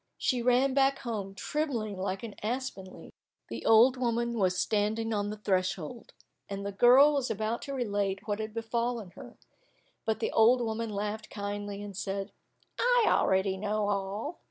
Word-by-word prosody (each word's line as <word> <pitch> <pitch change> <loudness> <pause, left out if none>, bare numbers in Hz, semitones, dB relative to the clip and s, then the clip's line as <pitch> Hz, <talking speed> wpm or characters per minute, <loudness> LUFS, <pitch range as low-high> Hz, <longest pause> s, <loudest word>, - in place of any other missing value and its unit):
She 250 -2 0
ran 250 +2 +3
back 275 0 +3
home, 205 -6 -5
trembling 235 -5 -2
like 190 +1 -3
an 225 -3 -6
aspen 240 -3 -3
leaf. 185 - -13 0.4
The - - -6
old 235 +4 +6
woman 235 -1 0
was 185 -2 +2
standing 220 +2 0
on 205 -1 -1
the 210 - -5
threshold, 190 +1 -2 0.4
and 200 0 -5
the 200 - -2
girl 255 +8 +6
was 275 -3 0
about 220 +2 -2
to 280 - -6
relate 205 -4 -2
what 205 0 -1
had 215 0 -4
befallen 230 -2 -2
her, - - -12 0.7
but 220 -1 -1
the - - -1
old 230 +3 +5
woman 230 -1 -2
laughed 210 +1 -4
kindly, 205 0 -5
and 205 -1 -8
said, 195 +1 -3 0.5
"I - - +4
already 190 0 +2
know 210 +1 -1
all." 205 - -3
215 Hz, 165 wpm, -29 LUFS, 200-240 Hz, 0.7 s, old